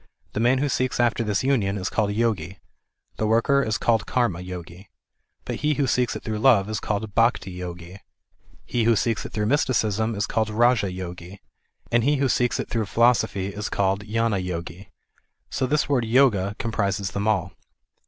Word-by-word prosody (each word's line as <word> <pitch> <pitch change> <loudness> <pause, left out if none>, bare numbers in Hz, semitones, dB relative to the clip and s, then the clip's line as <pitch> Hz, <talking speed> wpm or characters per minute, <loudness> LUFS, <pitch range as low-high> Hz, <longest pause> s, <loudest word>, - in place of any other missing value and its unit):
The - - -2
man 120 +3 +3
who 145 +3 0
seeks 130 -2 -1
after 120 -1 +2
this 105 -1 -1
union 110 -8 +1
is 95 0 -3
called 105 -2 0
Yogi. 105 -5 -1 0.6
The 110 - 0
worker 115 +5 +3
is 110 -6 -1
called 110 -1 +1
Karma 120 -9 0
Yogi; 90 +1 -9 0.6
he 150 0 -1
who 140 - +1
seeks 125 -1 +1
it - - -7
through 110 -1 -3
love 110 -5 +4
is 110 - -2
called 105 0 -3
Bhakti 115 -4 +2
Yogi, 90 +1 -8 0.7
he 120 -2 0
who 115 0 +4
seeks 115 +1 -1
it - - -16
through 105 -1 -1
mysticism 110 -4 +1
is 105 +1 0
called 110 0 -1
Raja 115 -3 +2
Yogi; 90 +1 -8 0.5
and 120 -1 +3
he 145 +4 +3
who 135 -1 +1
seeks 125 0 +1
it - - -3
through 110 -3 -2
philosophy 110 -3 +2
is 105 +1 -4
called 100 0 0
Gnana 115 -1 0
Yogi. 90 +2 -6 0.6
So 130 - -1
this 150 +3 +1
word 135 -4 +1
Yoga 110 -5 +3
comprises 100 -4 -1
them 100 +2 -2
all. 95 -4 0
110 Hz, 180 wpm, -24 LUFS, 95-120 Hz, 0.7 s, love